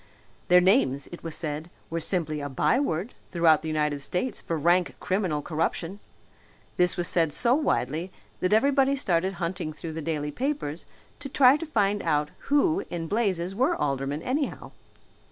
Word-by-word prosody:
Their 180 -1 +6
names, 175 - +3
it 175 - -9
was 165 -2 -4
said, 155 +1 -4 0.2
were 165 - -1
simply 155 -3 -2
a 145 - -4
byword 200 - 0 0.2
throughout 165 -3 +4
the 160 - -6
United 150 -2 -1
States 180 - -2
for 165 - -3
rank 175 +3 +2
criminal 185 -7 -1
corruption. 165 +4 -2 0.8
This 180 0 +2
was 175 -1 0
said 165 -4 +2
so 235 +10 +4
widely 165 - 0 0.3
that 185 - 0
everybody 275 +4 +3
started 190 -6 0
hunting 175 -2 -3
through 160 +1 -7
the 160 - -5
daily 150 -1 -2
papers 250 - -3 0.3
to 280 -1 -7
try 260 0 +6
to 330 +2 -5
find 205 -7 +1
out 150 -2 0 0.2
who 315 +6 +2
in 170 -1 -4
blazes 190 -2 -1
were 260 - +1
aldermen, 140 - -2
anyhow. 275 +3 -2
175 Hz, 160 wpm, -26 LUFS, 155-220 Hz, 0.8 s, Their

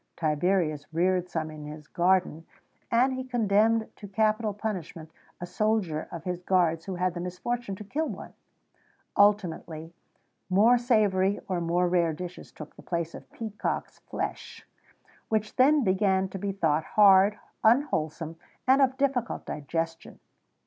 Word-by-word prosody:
Tiberius 155 -1 0
reared 180 +2 +1
some 160 -2 -3
in 155 -1 -9
his 150 0 -9
gardens; 175 -2 +1 0.4
and 250 +3 +3
he 260 0 -3
condemned 225 -2 +2
to 205 - -9
capital 215 +2 +1
punishment 180 -6 -5 0.3
a 175 - -4
soldier 190 -5 -1
of 170 - -7
his 180 -2 -3
guards 175 -3 +1
who 190 - -4
had 180 0 0
the 175 - -5
misfortune 195 +5 -4
to 210 - -9
kill 305 +10 -2
one.[XVII - - -8 0.8
129] 205 - +7
Ultimately, 170 -5 -5 0.6
more 220 +6 +5
savoury 205 -5 +2
or 185 -3 -1
more 175 +2 +1
rare 170 -2 +2
dishes 180 +3 -8
took 155 - -11
the - - -13
place 170 -2 -3
of - - -12
peacocks' 215 -2 -4
flesh, - - -5 0.6
which 215 -1 -1
then 280 +2 +5
began 190 -1 +2
to 195 - -6
be 200 +1 -2
thought 160 -5 +1
hard, 200 0 +6 0.3
unwholesome, 165 - +1 0.3
and 265 +2 +5
of 265 -1 +2
difficult 265 -4 -1
digestion. 165 +3 -4
190 Hz, 145 wpm, -27 LUFS, 165-215 Hz, 0.8 s, 129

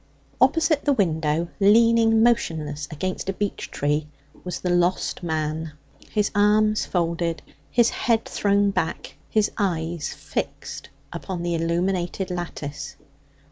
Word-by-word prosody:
Opposite 310 +3 +3
the 290 - +3
window, 165 - 0
leaning 225 +2 +5
motionless 155 -11 0
against 185 +5 -3
a - - 0
beech 205 +1 -3
tree, 150 +1 -1 0.4
was 180 -2 -4
the 180 - 0
lost 175 +1 +1
man, 160 -1 -2 0.4
his 210 -1 0
arms 210 +1 +3
folded, 170 -1 -1 0.3
his 235 -1 +3
head 230 -2 +1
thrown 200 0 +2
back, - - -3
his 215 -1 +2
eyes 170 -4 -1
fixed - - -5 0.2
upon 180 -2 -5
the 175 0 -1
illuminated 175 +2 -1
lattice. 155 -5 -5
180 Hz, 120 wpm, -24 LUFS, 165-210 Hz, 0.4 s, leaning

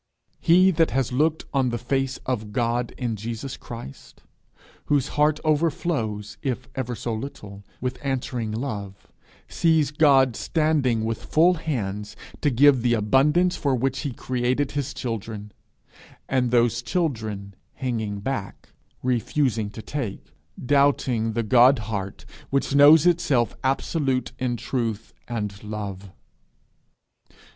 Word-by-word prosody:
He 185 +3 +5
that 165 -2 +2
has 135 -2 0
looked 155 +5 +1
on 135 -2 +2
the 120 - -2
face 135 +2 -1
of 110 -5 -3
God 120 0 0
in 120 -4 -2
Jesus 115 +5 -5
Christ, 115 - -11 0.6
whose 145 -2 +1
heart 150 +1 +2
overflows, 140 - -1
if 125 -2 -3
ever 125 -2 -3
so 115 +2 -3
little, 105 -4 -7 0.2
with 125 0 -3
answering 125 -5 -2
love, 105 -5 -4 0.5
sees 160 -3 +2
God 135 -5 +4
standing 145 -8 +1
with 115 0 -3
full 170 +4 +4
hands 105 - -4 0.3
to 150 - +3
give 135 0 +5
the 120 0 +2
abundance 150 - +3
for 140 -3 0
which 130 +2 -1
he 140 - -3
created 125 +3 -1
his 145 -1 -3
children, 110 -3 -5 0.8
and 130 -2 +1
those 120 -1 +2
children 110 - -2 0.2
hanging 110 -6 -3
back, 105 -5 -5 0.3
refusing 125 -3 0
to 110 +1 -9
take, 130 -9 -5 0.3
doubting 130 -5 +2
the 115 +1 0
God 125 +4 +6
heart 100 -3 -5 0.2
which 140 0 0
knows 145 +3 +7
itself 150 -9 +2
absolute 135 -1 0
in 125 -2 -1
truth 115 -3 -3
and 105 -4 -4
love. 100 -2 -6
125 Hz, 125 wpm, -24 LUFS, 110-140 Hz, 0.8 s, knows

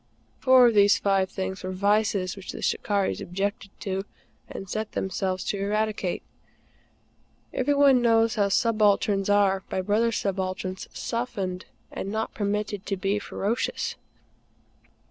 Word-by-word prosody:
Four 260 -1 +6
of 235 - +4
these 205 -1 +5
five 195 -2 +1
things 190 0 -4
were 185 - -3
vices 200 -1 +1
which 195 -2 -8
the - - -7
"Shikarris" 200 0 0
objected 200 +2 -3
to 195 -1 -2 0.5
and 195 - -7
set 215 +3 -4
themselves 190 -1 -2
to 200 - -2
eradicate. 210 -2 -1 1.3
Every 290 - +1
one 275 -3 +5
knows 230 -1 +3
how 205 -4 +1
subalterns 205 -2 +2
are, 195 -2 +3
by - - -2
brother 215 +4 +2
subalterns, 185 -2 -3
softened 200 -6 -3 0.3
and 195 - -5
not 220 +1 -2
permitted 205 -1 -2
to 195 - -1
be 195 +3 0
ferocious. 210 +3 -2
200 Hz, 130 wpm, -26 LUFS, 190-215 Hz, 1.3 s, Four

